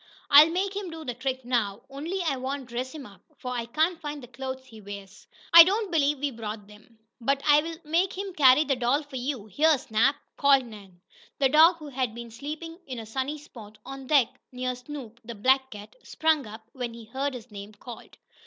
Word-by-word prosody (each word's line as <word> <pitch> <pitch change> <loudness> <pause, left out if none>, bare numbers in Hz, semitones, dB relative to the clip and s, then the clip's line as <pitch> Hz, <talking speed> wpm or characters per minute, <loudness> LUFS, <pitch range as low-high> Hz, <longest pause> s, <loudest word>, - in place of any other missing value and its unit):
I'll 295 +3 +9
make 380 +3 -1
him 400 -3 -4
do 320 -1 -8
the 250 - -3
trick 260 +1 -4
now, 220 -5 -1
only 320 +8 -4
I 305 -5 0
won't 265 +1 -4
dress 245 +2 -4
him 300 -4 -9
up, 200 -4 -15 0.2
for 250 - -6
I 235 -2 -3
can't 320 +8 0
find 295 -2 -6
the - - -10
clothes 260 +1 -6
he 220 -4 -14
wears. 200 -1 -10 0.3
I 335 0 +13
don't 400 +3 -1
believe 295 -3 +2
we 285 +1 -2
brought 215 -3 -6
them. 210 +2 -18 0.3
But 275 +3 +1
I'll 300 +3 +4
make 340 +5 0
him 390 -1 -5
carry 275 -1 +6
the 280 -3 0
doll 250 +5 +1
for 285 -2 -8
you. 250 -4 -3
Here, 295 - +3
Snap!" 255 +2 +2 0.2
called 275 -2 +4
Nan. 200 -6 -13 0.4
The 270 -2 +3
dog, 320 +5 +7
who 305 -3 -9
had 255 -4 -2
been 235 -1 -8
sleeping 310 +7 -7
in 255 -2 -6
a 225 - -6
sunny 265 +6 -3
Spot 220 -8 -13
on 270 -1 -8
deck, 275 -5 +4 0.2
near 255 0 -2
Snoop, 250 -3 -9
the 235 +1 -8
black 265 +5 +2
cat, 210 -2 -11
sprang 315 -5 0
up, 220 +1 -11
when 245 -3 -5
he 230 -1 -11
heard 265 +4 -3
his 240 -1 -10
name 200 +1 -9
called. 240 +3 -11
265 Hz, 210 wpm, -27 LUFS, 230-300 Hz, 0.4 s, I